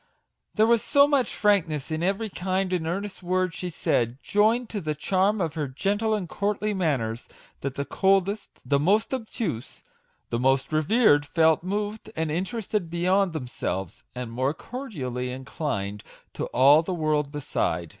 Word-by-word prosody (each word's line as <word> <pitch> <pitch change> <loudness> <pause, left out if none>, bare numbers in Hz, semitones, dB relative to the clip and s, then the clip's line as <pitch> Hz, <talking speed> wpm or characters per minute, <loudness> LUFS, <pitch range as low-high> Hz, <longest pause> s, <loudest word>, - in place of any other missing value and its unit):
There 215 - +5
was 230 -1 +4
so 280 -1 +5
much 280 -4 +2
frankness 165 -8 +1
in 155 0 -1
every 195 +5 0
kind 185 0 -1
and 165 -3 -1
earnest 195 +3 -4
word 185 0 0
she 180 +2 -4
said, 120 -6 0
joined 225 +4 +2
to 205 - -3
the 155 -2 -2
charm 190 +7 +1
of 165 -4 -1
her 155 -3 -2
gentle 205 +11 0
and 195 -4 -3
courtly 210 +3 -1
manners, 130 - -1 0.3
that 140 -1 -4
the 140 - -2
coldest, 195 - 0
the 140 +2 +3
most 205 - +2
obtuse, 220 - -4 0.5
the 115 - 0
most 135 +3 +1
reserved, 155 -2 +4
felt 160 -2 +3
moved 205 +3 -3
and 160 -1 -1
interested 195 +1 -2
beyond 180 +2 +2
themselves, 95 - -4
and 125 -2 -5
more 130 +5 0
cordially 135 - -5
inclined 125 -6 -4 0.3
to - - -3
all 140 +5 +6
the 180 +2 -3
world 150 -3 0
beside. 90 - -2
170 Hz, 155 wpm, -26 LUFS, 140-205 Hz, 0.5 s, all